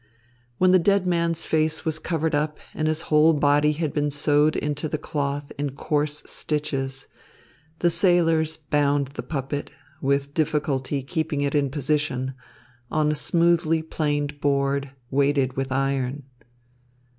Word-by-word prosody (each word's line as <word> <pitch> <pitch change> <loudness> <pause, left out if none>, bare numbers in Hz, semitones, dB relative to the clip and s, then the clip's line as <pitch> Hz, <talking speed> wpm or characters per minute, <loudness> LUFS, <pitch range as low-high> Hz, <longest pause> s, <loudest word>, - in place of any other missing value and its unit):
When 185 0 +4
the 185 - +6
dead 195 +2 +2
man's 170 -2 0
face 155 0 0
was 155 -1 -1
covered 160 -1 -1
up 150 +1 0 0.2
and 155 - -1
his 155 +1 -1
whole 155 +2 +6
body 145 0 +3
had 155 -1 -2
been 145 -1 0
sewed 145 +1 +2
into 150 +1 -2
the 155 - -1
cloth 145 -1 -3
in 140 -2 -2
coarse 150 0 -1
stitches, 135 -3 -2 0.7
the 175 +1 +2
sailors 165 -3 +3
bound 145 -2 +1
the 140 - -6
puppet, 145 -1 -4 0.3
with 140 +1 0
difficulty 145 -3 -1
keeping 160 0 -2
it 140 -1 0
in 145 -2 +2
position, 135 -2 -1 0.6
on 155 -1 +1
a - - +1
smoothly 165 +1 +2
planed 145 -2 -2
board, 140 0 +1 0.2
weighted 140 -1 +2
with 135 0 -3
iron. 135 0 -1
150 Hz, 140 wpm, -24 LUFS, 140-160 Hz, 0.7 s, the